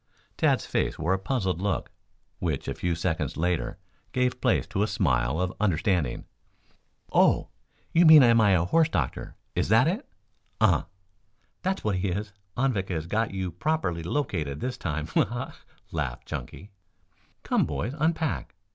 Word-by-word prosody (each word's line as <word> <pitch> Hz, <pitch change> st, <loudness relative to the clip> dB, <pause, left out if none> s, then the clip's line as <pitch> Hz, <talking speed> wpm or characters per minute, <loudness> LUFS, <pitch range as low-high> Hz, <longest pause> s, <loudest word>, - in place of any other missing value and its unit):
Tad's -, -, +2 dB
face -, -, -1 dB
wore 80 Hz, +4 st, +1 dB
a 95 Hz, -, 0 dB
puzzled 95 Hz, -5 st, -1 dB
look, 100 Hz, 0 st, -1 dB, 0.5 s
which 80 Hz, -6 st, -2 dB
a -, -, -1 dB
few 90 Hz, -1 st, -1 dB
seconds 80 Hz, -2 st, -2 dB
later 85 Hz, +1 st, -1 dB, 0.4 s
gave 125 Hz, 0 st, 0 dB
place -, -, +2 dB
to 100 Hz, -, -2 dB
a 105 Hz, -, +2 dB
smile 70 Hz, -, +1 dB
of 90 Hz, 0 st, -1 dB
understanding. 90 Hz, -, 0 dB, 0.9 s
"Oh! -, -, +4 dB, 0.4 s
you 170 Hz, -, +6 dB
mean, 155 Hz, -3 st, +10 dB
am 115 Hz, -2 st, +5 dB
I 100 Hz, -2 st, +5 dB
a 85 Hz, -2 st, +3 dB
horse 160 Hz, -, +3 dB
doctor? 75 Hz, -, -2 dB, 0.2 s
Is -, -, 0 dB
that -, -, +5 dB
it?" -, -, -2 dB, 0.5 s
"Uh." -, -, +3 dB, 0.8 s
"That's 190 Hz, +1 st, -1 dB
what 105 Hz, -3 st, 0 dB
he 95 Hz, +2 st, -1 dB
is. 100 Hz, +3 st, -3 dB, 0.2 s
Anvik 120 Hz, -7 st, 0 dB
has 80 Hz, -3 st, -2 dB
got 110 Hz, +5 st, 0 dB
you 95 Hz, -2 st, -3 dB
properly 90 Hz, -, -1 dB
located 80 Hz, -, -2 dB
this 125 Hz, 0 st, -3 dB
time. 75 Hz, -1 st, -3 dB
Ha, -, -, +2 dB
ha!" -, -, -6 dB, 0.4 s
laughed 70 Hz, -7 st, -3 dB
Chunky. 100 Hz, +2 st, -7 dB, 0.7 s
"Come, -, -, +1 dB
boys, 125 Hz, -, -3 dB
unpack. 160 Hz, -, -1 dB
95 Hz, 155 wpm, -27 LUFS, 80-120 Hz, 0.9 s, mean